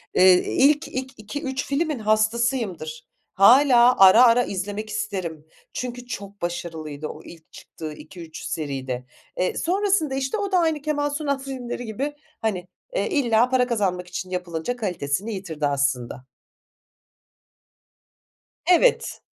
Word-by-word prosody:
eee, 185 0 +7 0.2
ilk, 295 +3 +4
ilk 260 0 -5
2-3 260 +5 -4
filmin 295 -1 -1
hastasıyımdır. 215 - 0 0.3
Hâlâ 245 +3 +6
ara 195 +5 +8
ara 240 +1 +5
izlemek 205 +2 -4
isterim. 180 -7 -4 0.3
Çünkü 245 0 -5
çok 200 -4 -8
başarılıydı 160 -4 -5
o - - -9
ilk 165 -2 -14
çıktığı 155 -2 -9
2-3 160 +1 -10
seride. 135 -4 -4 0.3
Eee, 180 - 0
sonrasında, 370 -5 +1
işte, 270 +8 -1
o 405 -1 -3
da 370 - +4
aynı 320 -3 +1
Kemal 290 0 -1
Sunal 285 -2 -1
filmleri 255 -3 -6
gibi, 265 +7 -3 0.3
hani, 190 -5 -2 0.3
eee, - - 0
illa 245 - +2
para 255 -1 +2
kazanmak 190 -7 -1
için 185 +1 -6
yapılınca 180 +3 -3
kalitesini 190 -1 -2
yitirdi 165 -7 -3
aslında. 135 -3 -1 2.4
Evet. 365 +8 +3
215 Hz, 125 wpm, -23 LUFS, 175-265 Hz, 2.4 s, ara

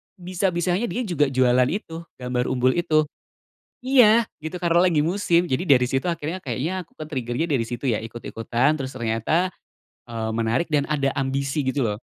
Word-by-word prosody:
bisa-bisa 180 -1 -1 0.2
dia 245 +2 -2
juga 165 - +1
jualan 125 -1 +3
itu, 165 -1 -4
gambar 125 -1 -2
umbul 130 0 +2
itu. 160 -3 +2 0.8
Iya, 235 -4 +6 0.2
gitu 160 +3 -4
karena 170 0 +3
lagi 170 -5 +3
musim. 170 +1 +2
Jadi 145 +6 0
dari 125 -5 +5
situ 135 +1 -1
akhirnya 165 +1 -3
kayaknya 155 +9 -3
aku 170 - -35
kan 155 - -7
trigger-nya 130 +2 -2
dari 135 -7 +1
situ 120 +4 -4
ya, 115 - +1
ikut-ikutan 120 +4 -1
terus 135 -3 -5
ternyata, 120 +9 0 0.6
eee, 115 -1 -4
menarik 115 +8 0
dan 145 -2 +1
ada 140 -2 +1
ambisi 135 +1 -1
gitu 130 -1 +1
lho. 105 -1 -2
145 Hz, 170 wpm, -23 LUFS, 125-170 Hz, 0.8 s, Iya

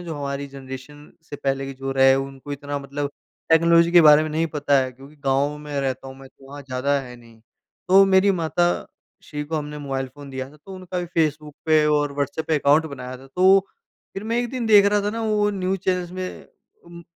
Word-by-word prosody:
ना, - - -9
जो 160 - -4
हमारी 140 0 -4
जनरेशन 135 +2 -11 0.2
से 145 - -6
पहले 135 -1 -2
के 135 - -6
जो 135 0 -4
रहे 135 0 +5
उनको 135 +1 -5
इतना 145 0 -4
मतलब 140 +1 -4 0.4
टेक्नोलॉजी 170 +1 +5
के 175 - +8
बारे 150 -1 +7
में 155 - -3
नहीं 160 +2 0
पता 145 -2 +1
है 130 - -4
क्योंकि 135 +4 -16
गाँव 140 +2 +1
में 150 0 -9
रहता 135 0 -3
हूँ 130 - -11
मैं, 135 0 -13
तो 135 - -20
वहाँ 145 +1 -9
ज़्यादा 140 +2 -1
है 125 -2 -10
नहीं। 115 -2 -18 0.5
तो 195 +1 +7
मेरी 195 +1 +4
माता 175 -1 +1 0.6
श्री 150 -1 -6
को 160 +2 -3
हमने 150 0 -5
मोबाइल 135 -2 -3
फ़ोन 145 -1 -11
दिया 130 0 -5
था 150 - -17
तो 195 - -8
उनका 185 -1 -6
भी 175 - -2
फेसबुक 150 -2 -1
पे 155 -1 +4
और 145 -1 +1
व्हाट्सएप 145 +2 -3
पे 160 - +2
अकाउंट 145 +3 +3
बनाया 130 -3 -7
था, 130 +1 -15
तो 190 +6 +4 0.5
फिर 195 +2 -6
मैं 230 +1 -1
1 245 - -1
दिन 255 -3 -3
देख 210 -2 +7
रहा 205 0 +2
था 205 - -1
ना 230 - -4
वो 210 -1 +1
न्यूज 190 -1 -2
चैनल्स 180 -2 -1
में 185 0 -6 0.4
उम, 170 0 -12
145 Hz, 225 wpm, -22 LUFS, 135-175 Hz, 0.6 s, के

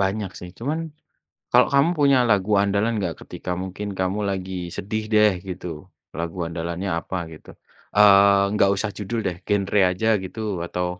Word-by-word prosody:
Banyak 100 0 -1
sih 90 - -9
cuman 145 +7 -2 0.7
kalau - - +6
kamu 140 +5 +4
punya 140 -2 +5
lagu 100 0 +2
andalan 100 +3 +1
enggak 85 -5 -2
ketika - - -7
mungkin 95 +2 -5
kamu 95 +2 -1
lagi 95 -1 -4 0.2
sedih 110 +3 -3
deh 105 -1 +6 0.2
gitu, 90 0 -6 0.5
lagu 85 +2 -4
andalannya 85 +3 -4
apa 95 - -5 0.2
gitu? 75 - -14 0.5
Eee, 100 -1 +6
enggak 100 -2 +3
usah 105 +2 -2
judul 105 +3 -3
deh, 90 -2 -2
genre 100 0 +1
aja 95 +5 -1 0.2
gitu 95 +4 -8 0.3
atau, 90 +1 -2
100 Hz, 160 wpm, -23 LUFS, 90-105 Hz, 0.7 s, kalau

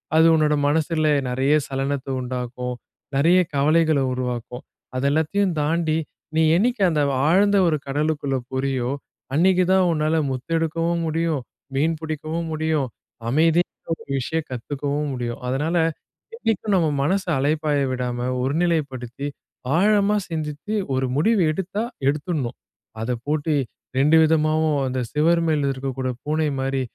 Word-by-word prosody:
அது 160 +1 +6
உன்னோட 155 -1 +3
மனசில 155 +1 +1 0.2
நெறைய 135 +4 +2
சலனத்த 135 0 -2
உண்டாக்கும், 125 0 -4 0.4
நெறையா 170 +6 +5
கவலைகள 155 +1 +3
உருவாக்கும். 125 -1 -4 0.3
அத 130 - -1
எல்லாத்தையும் 175 +5 +1
தாண்டி 160 +1 +1 0.4
நீ 160 - +4
என்னைக்கு 235 +3 +1
அந்த 155 -3 +1 0.3
ஆழ்ந்த 200 +4 +4
ஒரு 155 -2 +2
கடலுக்குள்ள 145 -1 0
போறியோ, 130 -2 -1 0.5
அன்னைக்கு 185 +3 +4
தான் 190 -1 +4
உன்னால 155 0 +1
முத்து 130 +4 -6
எடுக்கவும் 165 +1 0
முடியும், 160 -2 0 0.3
மீன் 160 +4 +2
புடிக்கவும் 160 +1 -3
முடியும், 155 -3 0 0.4
அமைதின்ற 165 +6 +1
ஒரு - - -16
விஷயம் 160 +5 -2
கத்துக்கவும் 145 +4 -3
முடியும். 120 -2 -4
அதனால 150 +6 0 0.6
என்னைக்கும் 215 - 0
நம்ம 165 -4 +3
மனச 190 +6 +1 0.2
அலைபாய 150 +1 +1
விடாம 125 -1 -2
ஒரு 135 +3 0
நிலைப்படுத்தி, 140 -6 -2 0.5
ஆழமா 205 +2 +3
சிந்தித்து 155 +4 -4 0.2
ஒரு 130 0 +1
முடிவு 210 +7 +3
எடுத்தா 190 +5 -3 0.2
எடுத்துணும். 145 -3 -1 0.4
அத 115 +3 -2 0.2
போட்டு 155 +1 0 0.4
2 150 +4 +5
விதமாவும் 155 -1 +2
அந்த 130 0 -2
சுவரு 165 +3 +3
மேல 145 -3 +1
இருக்கக்கூடிய 130 -1 -3
பூனை 155 +1 0
மாரி 135 0 -1
155 Hz, 125 wpm, -23 LUFS, 135-165 Hz, 0.6 s, அது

